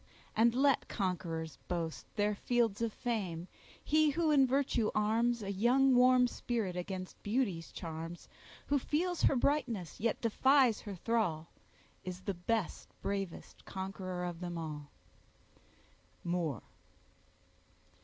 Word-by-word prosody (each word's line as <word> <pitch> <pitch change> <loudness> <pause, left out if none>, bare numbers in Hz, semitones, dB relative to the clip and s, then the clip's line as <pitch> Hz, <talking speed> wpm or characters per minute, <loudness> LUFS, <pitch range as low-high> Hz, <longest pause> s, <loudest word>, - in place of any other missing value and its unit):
And 230 +1 +4
let 275 0 +3
conquerors 170 -5 -3
boast 165 -2 -3
Their 210 0 +2
fields 230 0 0
of 230 -1 0
fame—he 220 - -1
who 315 +2 +1
in 275 -3 +5
virtue 255 -4 +1
arms 225 +2 +2
A 200 - -3
young 250 +7 +4
warm 250 0 +6
spirit 230 -6 -2
against 185 +1 -5
beauty's 205 -7 -1
charms, 165 +1 -6 0.4
Who 285 0 +2
feels 345 +6 -1
her - - +4
brightness, 240 - 0
yet 230 +1 0
defies 255 +1 +4
her 205 -2 -6
thrall, 175 -6 0 0.5
Is 185 0 -6
the 195 - -2
best, 190 +3 -2
bravest 195 -3 -4
conqueror 190 -1 -4
of 175 -1 -5
them 175 -1 -4
all. 150 -3 -6 1.3
—MOORE. 170 - -1
210 Hz, 120 wpm, -33 LUFS, 180-245 Hz, 1.3 s, warm